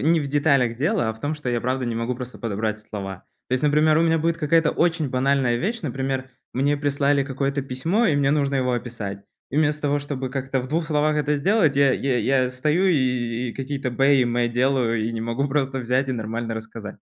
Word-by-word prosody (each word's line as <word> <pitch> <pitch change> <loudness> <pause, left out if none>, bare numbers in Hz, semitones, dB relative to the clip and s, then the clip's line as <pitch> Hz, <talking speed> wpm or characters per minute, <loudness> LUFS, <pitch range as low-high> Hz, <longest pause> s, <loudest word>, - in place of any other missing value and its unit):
не 165 +1 +3
в 140 - -3
деталях 140 -5 +2
дело, 155 - +1
а - - -1
в 110 - -16
том, 150 +2 -2
что 150 -4 -6
я 120 -1 0
правда 130 +1 -1
не 120 -1 -2
могу 115 +2 -2
просто 125 0 -8
подобрать 110 -1 -2
слова. 100 -3 -7 0.2
То - - -5
есть, 130 - -1
например, 155 +1 +4
у - - +3
меня 165 -1 +3
будет 165 +1 0
какая-то 165 0 +2
очень 165 -4 +1
банальная 130 -1 +1
вещь. 220 - -2
Например, 135 -1 -3 0.2
мне 140 +3 +1
прислали 140 -1 +1
какое-то 140 +1 -2
письмо, 160 - 0
и 150 - +2
мне 140 -1 +2
нужно 140 -2 +1
его 125 -1 +1
описать. 105 -5 -5 0.3
И 140 - -4
вместо 150 -1 +1
того, 145 0 +1
чтобы 135 -3 -4
как-то 135 -1 -2
в 130 - -7
двух 160 +2 -1
словах 150 0 +1
это 150 0 +1
сделать, 165 -1 +2
я 140 -2 +5
я 135 -2 0
я 130 +2 +2
стою 150 +8 +1
и 125 -6 0
и - - -5
какие-то 135 -1 -3
бэ 135 +2 +3
и - - +3
мэ 120 0 +1
делаю, 120 -2 +1
и 115 - -1
не 115 - -3
могу 115 +5 -1
просто 135 -1 0
взять 130 +3 0
и - - 0
нормально 115 0 -3
рассказать. 110 -1 -8
135 Hz, 225 wpm, -23 LUFS, 120-150 Hz, 0.3 s, я